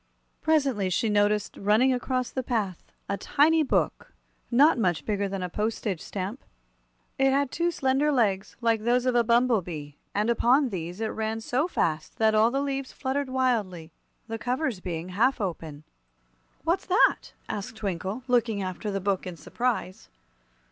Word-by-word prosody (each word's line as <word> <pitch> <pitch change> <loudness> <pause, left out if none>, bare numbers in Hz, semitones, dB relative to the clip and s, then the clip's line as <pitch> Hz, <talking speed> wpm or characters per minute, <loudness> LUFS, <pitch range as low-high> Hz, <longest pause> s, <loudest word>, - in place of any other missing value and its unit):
Presently 275 -11 +2
she 215 +5 +1
noticed 210 0 +1
running 220 +6 +3
across 255 0 -2
the 260 - -2
path 215 -8 -3 0.2
a 200 - -1
tiny 310 +6 +3
Book, 295 - 0 0.4
not 270 +3 +5
much 175 -9 0
bigger 205 -1 -1
than 195 -1 -4
a - - -1
postage 210 -1 -2
stamp. 200 +6 -5 0.8
It 270 0 +4
had 275 0 +1
two 340 +1 0
slender 280 -1 +1
legs, 210 -7 0
like 230 -2 +2
those 240 +2 +2
of 255 - +2
a 240 -1 +4
bumble 235 -1 +3
bee, 150 -4 -8 0.2
and 210 +3 +2
upon 255 +4 +3
these 180 0 -5
it 220 - 0
ran 220 0 -2
so 255 +7 0
fast 160 - -2
that 220 -1 +3
all 215 +1 +5
the 270 +3 -1
leaves 275 -1 -3
fluttered 275 0 -2
wildly, 215 -11 -1 0.4
the 225 0 -5
covers 250 -2 -1
being 175 -1 -5
half 235 +9 +2
open. 160 -6 -5 0.8
"What's - - 0
that?" - - +3
asked 205 +2 -5
Twinkle, 200 +2 -4
looking 230 -5 +1
after 185 +3 -4
the 195 -1 -2
book 195 -1 -1
in 175 -2 -7
surprise. 185 - -3
225 Hz, 160 wpm, -27 LUFS, 190-255 Hz, 0.8 s, not